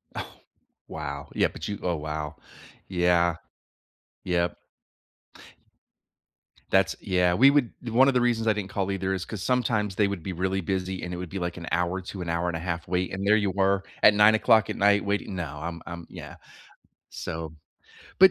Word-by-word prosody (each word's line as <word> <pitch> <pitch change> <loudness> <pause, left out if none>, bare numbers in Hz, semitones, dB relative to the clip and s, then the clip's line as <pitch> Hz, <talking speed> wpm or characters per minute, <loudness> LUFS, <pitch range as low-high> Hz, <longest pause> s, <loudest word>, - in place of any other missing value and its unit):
Ugh, - - -3 0.6
wow. 70 -1 -6
Yeah, - - +3
but 80 - -7
you 100 -1 -4
oh, 90 -1 0
wow. 75 0 -4 0.5
Yeah, 85 -2 +2 0.9
Yep. 85 -1 0 2.1
That's - - +3
yeah. 90 -1 +2
We 135 +9 +7
would 140 -4 +2 0.2
one 130 +4 +5
of 135 - +3
the 125 - +3
reasons 115 -2 +1
I 110 - +5
didn't 105 -2 -4
call 100 -2 -2
either 95 0 -1
is 95 -1 -3
'cause 105 -4 -6
sometimes 110 -6 0
they 105 - +3
would 100 -5 -4
be 95 - -4
really 95 +2 -1
busy, 95 0 -3
and 90 - -4
it 90 - -4
would 90 -1 -6
be 95 +3 -4
like 85 0 -3
an 85 -1 -7
hour 90 +2 0
to 95 0 -7
an 85 - -4
hour 85 +1 0
and 85 - -2
a - - -3
half 85 -1 -4
wait, 90 +1 -1
and 95 +1 -3
there 105 - +6
you 100 -3 +1
were 95 0 +1 0.2
at 105 - +8
9:00 110 +2 +5
at 105 - -2
night 100 0 +4
waiting. 100 -1 -2
No. 80 -5 -5
I'm 85 0 -5
I'm 85 -1 -7
yeah. - - -9 0.7
So, 80 -1 -6 0.7
but 190 0 +9
95 Hz, 190 wpm, -26 LUFS, 85-105 Hz, 2.1 s, but